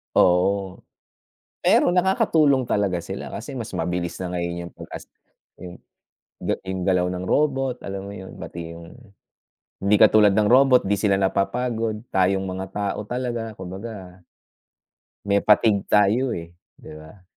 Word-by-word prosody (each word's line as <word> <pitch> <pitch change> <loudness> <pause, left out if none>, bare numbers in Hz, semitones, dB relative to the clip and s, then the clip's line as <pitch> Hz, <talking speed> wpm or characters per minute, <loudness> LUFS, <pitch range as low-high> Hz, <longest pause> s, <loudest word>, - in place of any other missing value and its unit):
Oo. 95 +1 +2 0.8
Pero 175 - +4
nakakatulong 160 -7 +3
talaga 100 -5 0
sila, 95 +3 -7
kasi 120 +7 -7
mas 115 -3 -5
mabilis 85 +1 -3
na 90 -1 -4
ngayon 85 0 -3
yung - - -12
'pag, - - -11
as - - -8 0.5
yung 90 -1 -10 0.6
ga - - -1
yung 95 -1 -3
galaw 90 -1 +2
ng 90 0 -4
robot, 135 -1 +1
alam 100 0 -6
mo - - -8
'yon, 95 -1 -10
pati 85 -1 -8
yung 85 0 -12 0.9
hindi 100 +2 +3
katulad 105 -1 +6
ng 105 -1 +3
robot, 130 +1 +5
'di 100 +1 +1
sila 100 -1 +2
napapagod, 110 +3 -1
tayong 95 0 +2
mga 95 0 -4
tao 100 0 -2
talaga, 120 -3 -4
kumbaga 95 0 -9 1.1
may 100 0 +2
fatigue 105 -1 +4
tayo, 105 +6 +3
eh, 85 0 -9 0.2
'di - - -12
ba? 90 +4 -16
100 Hz, 145 wpm, -23 LUFS, 90-115 Hz, 1.1 s, katulad